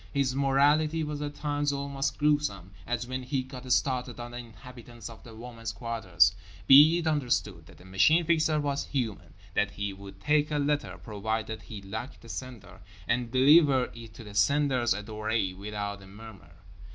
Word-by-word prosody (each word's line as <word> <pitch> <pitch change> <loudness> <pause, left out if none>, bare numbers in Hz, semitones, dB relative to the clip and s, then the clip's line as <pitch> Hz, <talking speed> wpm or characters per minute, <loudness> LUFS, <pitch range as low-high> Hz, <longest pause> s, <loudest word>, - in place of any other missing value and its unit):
His 140 -2 0
morality 145 +4 +2
was 150 -1 -4
at 145 0 -4
times 145 -1 -1
almost 140 -1 -2
gruesome; 145 -11 0 0.2
as 120 0 -2
when 130 +1 -4
he 130 +1 -2
got 130 -1 -8
started 125 -1 0
on 120 0 -7
the 120 - -7
inhabitants 120 0 -11
of 115 - -14
the 115 -2 -12
women's 115 -1 -7
quarters. 95 -7 +2 0.3
Be 150 - +8
it 170 - -3
understood 120 - -1
that - - -16
the 90 - -16
Machine 155 - +3
Fixer 155 -2 +2
was 140 -1 -1
human, 120 -7 -4 0.2
that 105 - +1
he 100 -1 -4
would 95 0 -12
take 150 +7 +2
a 150 - -1
letter—provided 110 -7 -2
he 105 -3 -9
liked 110 +7 -7
the 115 - -14
sender—and 115 -1 -5
deliver 135 0 +5
it 115 -2 -11
to 115 - -10
the 105 -1 -11
sender's 130 +1 +2
adorée 105 -2 -2
without 100 0 -5
a 95 - -13
murmur. 95 -5 -13
120 Hz, 165 wpm, -28 LUFS, 105-140 Hz, 0.3 s, Be